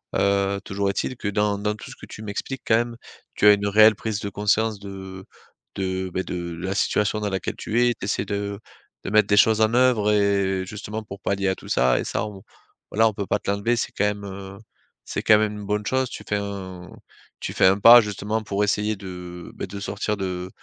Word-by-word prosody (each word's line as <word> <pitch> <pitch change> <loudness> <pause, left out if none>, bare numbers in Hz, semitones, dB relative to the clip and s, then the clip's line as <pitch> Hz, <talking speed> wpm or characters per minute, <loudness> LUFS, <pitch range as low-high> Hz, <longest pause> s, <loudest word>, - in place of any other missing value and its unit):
Heu, 100 0 +1
toujours 100 -1 -1
est-il 115 +6 -2
que, 105 - -4
dans 105 0 +1
dans 105 +1 -1
tout 105 - -11
ce - - -10
que - - -12
tu - - -10
m'expliques, 110 +5 -5
quand 110 - +4
même, 120 0 -2 0.4
tu - - +1
as 105 - +10
une 100 0 0
réelle 110 +1 +6
prise 105 0 -3
de 100 - -4
conscience 105 +1 0
de 95 -1 -9 0.5
de, 95 -1 -2
beh, 95 - -1
de 85 -2 -5
la 95 +2 -2
situation 105 +2 +1
dans 105 -1 -2
laquelle 95 -2 -3
tu 120 +3 +1
es 120 - +2
tu 100 - -7
essaies 105 - -1
de 100 -1 -3 0.4
de - - -4
mettre 105 0 +4
des 105 - +3
choses 110 +1 +5
en 110 +1 +3
œuvre 120 -4 +3
et 100 -2 +1
justement, 105 +2 -6
pour 100 -1 -10
pallier 100 0 -1
à 95 - 0
tout - - -13
ça 65 0 +3
et - - -2
ça, - - -2
on 100 -2 -9 0.5
voilà, 110 +2 +4
on 110 - -1
peut 100 0 -4
pas - - +1
te - - -6
l'enlever. 100 +4 +1
C'est 120 - -2
quand 105 - 0
même, 105 0 -2
heu, 95 0 -8 0.5
c'est - - -3
quand 105 - +6
même 105 0 +1
une 105 -1 -7
bonne 105 +1 -1
chose. 130 +1 0
Tu - - -8
fais 105 - 0
un 95 -3 -6 0.5
tu - - -5
fais - - +3
un 95 +1 +4
pas, 120 +4 +10
justement, 105 +1 -3
pour 100 -1 -1
essayer 105 +1 0
de, 90 -3 -9
beh, - - -5
de 100 - -7
sortir 105 +1 -3
de 90 -2 -4
100 Hz, 235 wpm, -24 LUFS, 95-105 Hz, 0.5 s, as